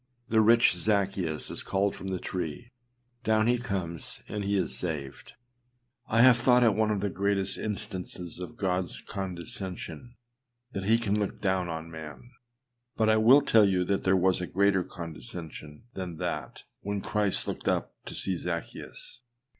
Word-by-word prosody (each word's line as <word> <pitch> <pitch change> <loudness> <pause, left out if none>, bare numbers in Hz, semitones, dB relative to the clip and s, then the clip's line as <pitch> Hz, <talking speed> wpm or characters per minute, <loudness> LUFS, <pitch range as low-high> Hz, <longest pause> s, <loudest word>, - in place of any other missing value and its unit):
The 110 0 +4
rich 115 0 +6
Zaccheus 95 -4 +1
is - - 0
called 100 +1 0
from 95 - -7
the 95 -1 -1
tree; 90 - -5 0.5
down 110 0 +3
he 120 +1 +3
comes, 95 -8 -3
and 105 0 -3
he 100 0 +1
is 95 - 0
saved. 70 -6 -4 0.7
I 115 +2 +4
have 130 -2 +8
thought 125 0 +5
it 115 -3 +5
one 110 +1 +1
of 105 -2 0
the 100 - 0
greatest 100 0 0
instances 90 -4 -5
of 90 +6 -7
Godâs 95 -4 -1
condescension 95 +2 -5 0.6
that 95 -4 -4
he 110 +3 +5
can 105 -2 0
look 100 - -2
down 95 -3 0
on 80 0 -5
man; 80 +9 -9 0.6
but 110 -1 +2
I 110 - +4
will 120 +6 +7
tell 110 -7 +5
you 90 -1 +1
there 95 0 +2
was 95 0 +2
a 90 - -3
greater 100 -1 +3
condescension 80 - -7
than 90 -3 -5
that, - - -4 0.2
when 100 0 -3
Christ 105 -2 0
looked - - -4
up - - 0
to - - -7
see 95 - -1
Zaccheus. 85 +7 -5
95 Hz, 160 wpm, -28 LUFS, 90-110 Hz, 0.7 s, have